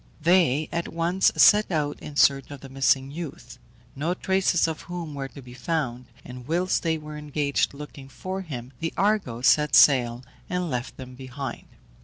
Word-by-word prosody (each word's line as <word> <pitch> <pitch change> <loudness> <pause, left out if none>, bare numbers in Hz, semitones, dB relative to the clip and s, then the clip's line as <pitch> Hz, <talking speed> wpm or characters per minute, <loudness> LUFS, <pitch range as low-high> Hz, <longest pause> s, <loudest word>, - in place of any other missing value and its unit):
They 160 -3 +3
at 170 0 -2
once 170 +3 +2
set 210 0 +6
out 150 -3 -1
in 150 - -9
search 140 -1 +3
of 145 -2 -9
the 135 - -10
missing 135 0 +1
youth, 160 -2 -8 0.4
no 160 +6 -1
traces 190 -3 +1
of 160 -1 -4
whom 170 -4 -5
were 135 -1 -4
to 140 0 -13
be 125 0 -12
found, 125 -2 -3 0.2
and 125 0 -10
whilst 175 +4 0
they 160 -1 0
were 150 -1 -8
engaged 145 -1 -1
looking 140 -2 -10
for 190 +7 -5
him, 130 -7 -8
the 165 0 -3
Argo 195 - 0
set 150 +2 +4
sail 125 -3 +5 0.3
and 180 -2 -2
left 125 0 -4
them 130 -1 -9
behind. 130 0 -7
150 Hz, 175 wpm, -25 LUFS, 135-170 Hz, 0.4 s, set